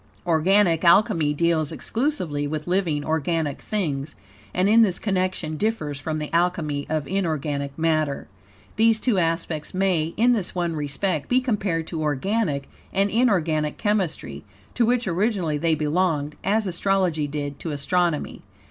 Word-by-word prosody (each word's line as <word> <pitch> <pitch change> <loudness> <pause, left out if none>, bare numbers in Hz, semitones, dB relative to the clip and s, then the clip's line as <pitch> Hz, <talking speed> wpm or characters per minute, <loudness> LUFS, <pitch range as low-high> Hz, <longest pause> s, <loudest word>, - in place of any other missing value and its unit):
Organic 170 +1 +3
Alchemy 170 -4 +4
deals 165 -1 +1
exclusively 175 - -2
with 150 +1 -4
living, 175 -5 0
organic 160 -2 -1
things, 155 -8 -3 0.4
and 185 +2 +1
in 225 +3 +6
this 190 -5 +3
connection 185 -6 -1
differs 155 -9 -2
from 155 +2 -3
the 150 0 -5
Alchemy 165 -4 0
of 155 -3 -1
inorganic 150 -7 -2
matter. 155 -3 0 0.5
These 225 0 +4
two 220 -6 +1
aspects 165 -1 -2
may, 180 -4 0
in 240 +3 +4
this 205 -7 0
one 170 -2 -1
respect, 150 +2 -2
be 250 - +4
compared 200 -10 -1
to 160 -1 -4
organic 150 +1 -1 0.2
and 195 +1 +1
inorganic 170 -10 +1
chemistry, 205 -6 -2 0.3
to 235 -2 +2
which 245 -1 +1
originally 180 -4 0
they 165 +1 +2
belonged; 150 -1 0
as 210 +3 +1
astrology 180 -4 0
did 145 -1 -5
to 165 - -5
astronomy. 160 +2 -1
170 Hz, 140 wpm, -24 LUFS, 150-195 Hz, 0.5 s, in